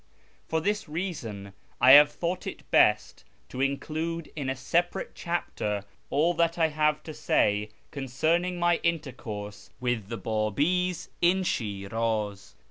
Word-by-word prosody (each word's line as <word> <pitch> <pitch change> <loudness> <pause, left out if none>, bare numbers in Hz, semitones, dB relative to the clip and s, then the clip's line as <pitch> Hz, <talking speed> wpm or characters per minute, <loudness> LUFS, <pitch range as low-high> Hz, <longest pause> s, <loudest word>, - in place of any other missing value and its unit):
For 160 - 0
this 205 -2 -1
reason 120 - -5 0.3
I 130 - +7
have 145 +2 +9
thought 175 +1 -3
it - - -7
best - - +3 0.3
to 130 - -5
include 155 +4 -2
in 140 -4 -3
a 130 - -1
separate 170 +7 -1
chapter 105 - -3 0.3
all 160 +5 +2
that 170 0 +1
I 165 -2 +3
have 150 0 +1
to 155 - -7
say 105 -6 +1 0.2
concerning 160 +7 0
my 175 -1 +3
intercourse 115 -11 -4
with 120 -5 -1
the 115 +1 -4
Babi's 145 - 0
in 185 +2 +3
Shiraz. 105 - -2
145 Hz, 130 wpm, -27 LUFS, 110-170 Hz, 0.3 s, have